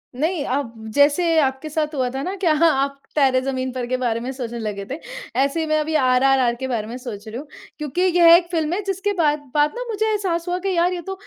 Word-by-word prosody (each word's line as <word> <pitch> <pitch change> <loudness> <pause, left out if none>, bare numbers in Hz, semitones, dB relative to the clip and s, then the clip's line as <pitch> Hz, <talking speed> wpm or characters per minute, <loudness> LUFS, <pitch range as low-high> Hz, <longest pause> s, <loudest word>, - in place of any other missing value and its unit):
नई 315 +4 -1
अब 255 -5 -3 0.2
जैसे 285 +4 +4 0.2
आपके 265 +3 -1
साथ 305 0 -2
हुआ 255 -2 0
था 270 - -2
न 375 +2 -3
कि 350 - +1
आप 280 -3 +2 0.2
तारे 265 -3 +4
ज़मीन 260 -1 -2
पर 250 -2 -3
के 255 +1 -1
बारे 235 -2 -1
में 250 +3 -4
सोचने 240 -3 -5
लगे 205 -2 -4
थे, 270 - -3 0.4
ऐसे 280 +4 +1
ही 320 - 0
मैं 310 0 +2
अभी 310 +1 -2
आरआरआर 255 -2 +3
के 260 +2 -5
बारे 220 -4 -2
में 240 +2 -6
सोच 225 -4 -8
रही 220 +2 -6
हूँ। 290 +2 -8 0.3
क्योंकि 300 +3 -3
यह 345 -2 +6
एक 345 0 +2
फ़िल्म 320 -1 0
है 410 - -1
जिसके 390 +2 -1
बाद 300 -4 +1
बाद 295 0 +3
न - - -4
मुझे 435 0 -1
एहसास 360 -5 -1
हुआ 355 0 0
कि - - +1
यार 350 +2 +2
ये 350 - -4
तो 385 - -3
285 Hz, 245 wpm, -21 LUFS, 255-335 Hz, 0.4 s, यह